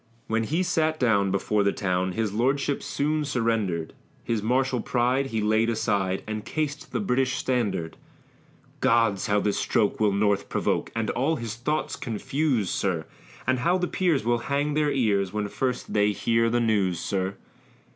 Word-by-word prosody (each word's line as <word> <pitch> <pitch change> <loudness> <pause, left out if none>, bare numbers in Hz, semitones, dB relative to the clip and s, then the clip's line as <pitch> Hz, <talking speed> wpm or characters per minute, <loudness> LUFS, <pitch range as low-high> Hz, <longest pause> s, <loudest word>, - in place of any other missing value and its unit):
When 115 0 0
he 165 +9 0
sat 160 -3 +1
down 100 -6 +3
before 100 +2 +1
the 100 0 +3
town, 95 -1 -1
His 110 0 -1
Lordship 135 +5 +1
soon 150 +2 -1
surrender'd; 115 - -1 0.3
His 115 -2 -1
martial 125 +2 +1
pride 125 +2 +1
he 110 -4 -2
laid 110 +2 +2
aside, 100 -4 0
And 110 0 -4
cas'd 150 +2 -3
the - - -1
British 130 -7 +1
standard; 100 -12 -1 0.8
Gods! 115 -3 +2
how 105 -1 +3
this 100 0 0
stroke 110 -3 +1
will 105 -2 +3
North 100 0 +1
provoke, - - -1
And 115 -1 0
all 135 +6 +1
his 115 -5 -4
thoughts 150 +7 -2
confuse, 120 - -1
sir! - - -1 0.4
And 130 0 +1
how 175 +7 +2
the 180 -1 -1
Peers 170 - +1
will 120 0 +2
hang 145 +1 +1
their 150 0 +2
ears, 100 -8 +1
When 105 -1 -1
first 125 +2 -2
they 105 0 +3
hear 115 +2 +2
the 120 +1 +1
news, 100 -7 +1
sir. 95 0 -2
115 Hz, 165 wpm, -26 LUFS, 105-135 Hz, 0.8 s, down